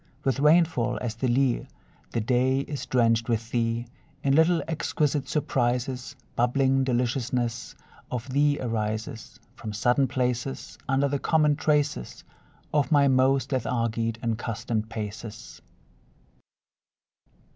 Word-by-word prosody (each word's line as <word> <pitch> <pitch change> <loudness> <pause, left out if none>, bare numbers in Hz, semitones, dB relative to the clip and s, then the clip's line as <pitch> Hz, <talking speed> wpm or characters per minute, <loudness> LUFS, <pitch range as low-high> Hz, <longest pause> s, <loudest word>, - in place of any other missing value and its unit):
With 135 0 0
rainfall 155 -4 +3
as 120 -3 -3
the 120 +3 -2
lea, 125 0 +1 0.4
The 115 - -1
day 130 +4 +2
is 145 0 -6
drenched 115 -2 +2
with 115 0 -1
thee; 115 0 0 0.4
In 135 - +3
little 165 +3 +4
exquisite 150 -3 -1
surprises 125 -2 -1 0.2
Bubbling 135 +2 +2
deliciousness 120 -1 -1 0.3
of 125 0 -4
thee 145 +1 +3
arises 110 -2 -3
From 110 - -7
sudden 120 +5 +2
places, 125 0 -2
Under 135 +1 +3
the 140 0 -1
common 150 -2 +3
traces 150 - 0 0.5
Of 145 -4 +1
my 145 -2 +5
most 130 +1 +3
lethargied 115 -3 -1
and 115 -1 -1
customed 115 -1 -3
paces. 110 0 -7
125 Hz, 115 wpm, -26 LUFS, 115-140 Hz, 0.5 s, my